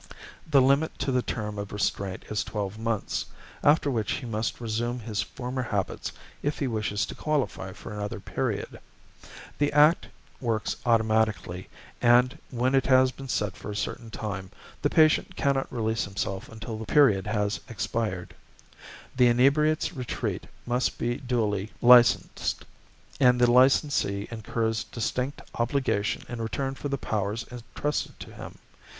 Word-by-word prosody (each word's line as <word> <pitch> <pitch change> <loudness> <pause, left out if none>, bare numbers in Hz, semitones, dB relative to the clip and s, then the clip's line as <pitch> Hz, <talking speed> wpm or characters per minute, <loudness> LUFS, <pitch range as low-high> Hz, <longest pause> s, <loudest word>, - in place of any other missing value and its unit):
The 140 -4 +6
limit 140 +4 +2
to 135 - -1
the 125 -1 +2
term 105 -4 -4
of 100 -1 -5
restraint 100 -2 -2
is 105 - 0
twelve 105 0 -4
months, 115 -2 -2 0.4
after 145 -1 +4
which 110 -5 0
he 135 - -4
must 115 0 -2
resume 120 +1 -2
his 110 -1 -2
former 125 0 -4
habits 105 -6 -2 0.3
if 145 +1 -1
he 140 - -1
wishes 105 -4 -1
to - - -7
qualify 140 -10 -2
for 105 - -9
another 105 0 -4
period. - - -3 0.8
The 145 0 +2
Act 150 +3 +5 0.3
works 115 -4 -1
automatically, 110 -5 +1 0.3
and, 125 +1 +5
when 125 +1 0
it 135 -1 +3
has 130 -1 +5
been 135 +1 -9
set 105 -6 -1
for - - -8
a 105 - -4
certain 115 +2 -4
time, 100 -4 -5 0.3
the - - +2
patient 155 -1 +4
cannot 140 -1 0
release 110 -2 -1
himself 95 0 -4
until 110 0 -6
the 110 - -5
period 110 -10 +4
has 105 0 0
expired. 105 -5 -3 0.8
The 125 -1 +5
Inebriates' 150 +7 +3
Retreat 125 -5 -3 0.2
must 125 +1 0
be 120 +1 -1
duly 110 -6 -1
licensed, 120 0 +5 0.5
and 125 -2 +5
the 120 -1 +5
licensee 125 -5 +3
incurs 110 0 -1
distinct 125 +4 -3
obligation 120 -4 0
in 120 -1 -5
return 135 +4 -2
for 145 +1 -5
the 140 - -1
powers 110 -1 -2
entrusted 125 +5 -3
to - - -9
him. - - -9
120 Hz, 145 wpm, -27 LUFS, 105-130 Hz, 0.8 s, The